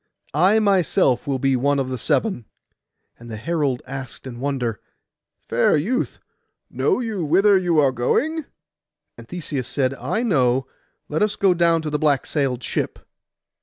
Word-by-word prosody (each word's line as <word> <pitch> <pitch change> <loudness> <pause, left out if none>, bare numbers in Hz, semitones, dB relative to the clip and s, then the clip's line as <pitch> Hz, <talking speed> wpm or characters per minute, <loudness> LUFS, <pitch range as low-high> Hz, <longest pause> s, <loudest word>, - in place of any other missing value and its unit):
I 185 +9 +4
myself 190 - +2
will 135 -2 0
be 135 0 +1
one 140 +3 +1
of 135 -2 -1
the 130 - -3
seven.' 190 - 0 0.7
And 120 0 -12
the 110 - -6
herald 140 -1 -1
asked 135 -2 -8
in 120 -2 -8
wonder, 125 -5 -2 0.7
'Fair 120 +6 +3
youth, 220 - -1 0.5
know 425 - +1
you 220 -7 -3
whither 195 +7 +4
you 175 -3 +2
are 140 -3 +4
going?' 285 - 0 0.7
And - - -13
Theseus 150 -7 -4
said, 130 -1 0
'I 150 - -2
know. 130 - +2 0.4
Let 150 - -2
us 210 0 +1
go 195 -3 +3
down 170 -1 +2
to 155 - -3
the 150 - 0
black 145 -3 +2
sailed 130 -4 -1
ship. - - -2
145 Hz, 160 wpm, -22 LUFS, 130-185 Hz, 0.7 s, I